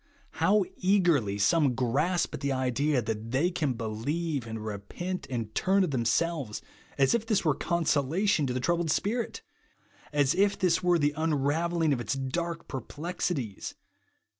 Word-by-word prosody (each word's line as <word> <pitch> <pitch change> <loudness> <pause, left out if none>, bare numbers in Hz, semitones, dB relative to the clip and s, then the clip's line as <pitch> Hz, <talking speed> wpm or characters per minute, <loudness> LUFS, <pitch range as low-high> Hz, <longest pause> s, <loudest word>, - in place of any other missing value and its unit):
How 205 -1 +4
eagerly 170 - +2
some 135 +5 +3
grasp 145 +9 +1
at - - -4
the 140 0 -1
idea, 130 +1 +1
that 110 +1 -4
they 140 +9 +1
can 150 -8 -1
beheve, 125 +6 -2
and 110 -1 -5
repent, 110 - -5
and 115 -4 -4
turn 195 +1 +3
of 175 - -1
themselves, 135 0 0 0.4
as 135 -1 +4
if 235 -2 +1
this 215 -5 +1
were 155 - +4
consolation 165 +1 +1
to 125 - -1
the 130 - -1
troubled 170 +4 0
spirit 225 +9 -1 0.7
1 150 - -3
as 140 0 +3
if 200 +1 +2
this 180 -4 +2
were 175 -1 +3
the 145 -2 +1
un 160 +1 0
ravelling 160 +3 +1
of 125 - -2
its 125 - -2
dark 165 +5 -3
perplexities 140 - -4
150 Hz, 160 wpm, -28 LUFS, 125-175 Hz, 0.7 s, How